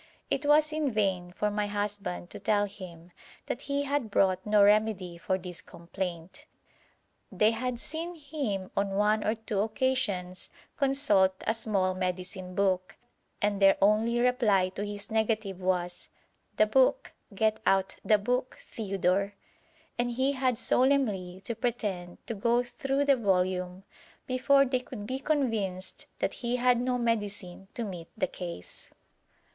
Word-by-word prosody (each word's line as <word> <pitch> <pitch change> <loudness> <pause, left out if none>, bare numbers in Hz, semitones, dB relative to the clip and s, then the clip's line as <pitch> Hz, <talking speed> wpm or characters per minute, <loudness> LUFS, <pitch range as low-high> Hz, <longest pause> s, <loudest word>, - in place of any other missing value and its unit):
It 290 - 0
was 305 +1 +5
in 310 -2 0
vain 190 -5 0
for 210 +3 -1
my 205 0 -1
husband 205 - -3
to - - -7
tell 205 -1 +2
him 180 -4 -11 0.3
that 245 - -4
he 280 0 -1
had 285 -5 -1
brought 185 -2 +2
no 210 -1 +5
remedy 205 -4 +2
for 185 +2 0
this 180 -1 -7
complaint. 180 - -6 0.9
They 215 +1 +3
had 240 +1 -3
seen 330 +6 -2
him 275 - -4
on 200 -1 0
one 210 +1 +2
or 215 - +1
two 220 -2 -3
occasions 210 -6 -1 0.3
consult 215 -10 +3
a - - +2
small 205 -5 0
medicine 185 0 -3
book, 190 -1 0 0.5
and 205 -1 +1
their 195 -1 +6
only 220 +4 +3
reply 235 -7 +3
to 195 +2 -5
his 205 0 -5
negative 220 -4 0
was, 180 -1 -1 0.5
'The 215 - +6
book; 265 - +2 0.2
get 215 +2 +1
out 195 0 +2
the 215 - +5
book, 250 +5 -1
Theodore,' 195 -1 -1 0.6
and 240 0 +1
he 260 +3 +1
had 260 -3 0
solemnly 220 -9 +2
to 235 - -3
pretend 210 -7 -3
to 230 - -3
go 235 +3 +2
through 270 +3 -1
the 280 -2 +4
volume 185 -3 0 0.4
before 275 +2 +4
they 255 -1 0
could 245 -4 -8
be 260 +4 -3
convinced 225 -11 -1
that - - -1
he 240 0 0
had 250 -1 +3
no 250 0 0
medicine 205 -5 -2
to 235 - -2
meet 180 -5 -6
the - - +2
case. 170 - -8
210 Hz, 150 wpm, -29 LUFS, 185-250 Hz, 0.9 s, their